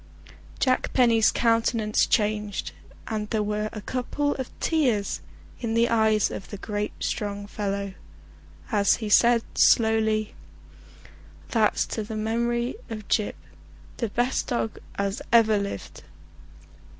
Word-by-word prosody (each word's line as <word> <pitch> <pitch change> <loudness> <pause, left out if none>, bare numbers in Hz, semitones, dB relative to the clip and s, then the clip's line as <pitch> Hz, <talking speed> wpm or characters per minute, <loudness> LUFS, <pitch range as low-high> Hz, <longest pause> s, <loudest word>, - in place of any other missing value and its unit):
Jack 255 -1 +1
Penny's 230 -4 +5
countenance 230 -2 +2
changed, 210 -2 0 0.4
and 210 -1 -3
there 220 -2 0
were 210 +1 -2
a 215 - -7
couple 260 +5 -1
of 260 -2 -4
tears 250 -11 +1 0.4
in 230 -2 -2
the 235 +1 +3
eyes 220 -2 +3
of 195 - -7
the 205 - -6
great 205 +1 -3
strong 205 -1 -3
fellow 200 -1 -3 0.8
as 205 -2 +4
he 220 -3 -5
said 235 +2 +5
slowly: 220 -1 +3 1.2
"That's 220 -3 +2
to 220 - -4
the 215 +1 -6
memory 235 - -1
of 215 -3 -7
Gyp, 210 - +1 0.6
the 230 - -2
best 245 +5 0
dog 230 -3 -2 0.2
as 200 +1 -2
ever 220 -3 +5
lived!" 200 - -6
220 Hz, 125 wpm, -25 LUFS, 210-235 Hz, 1.2 s, Penny's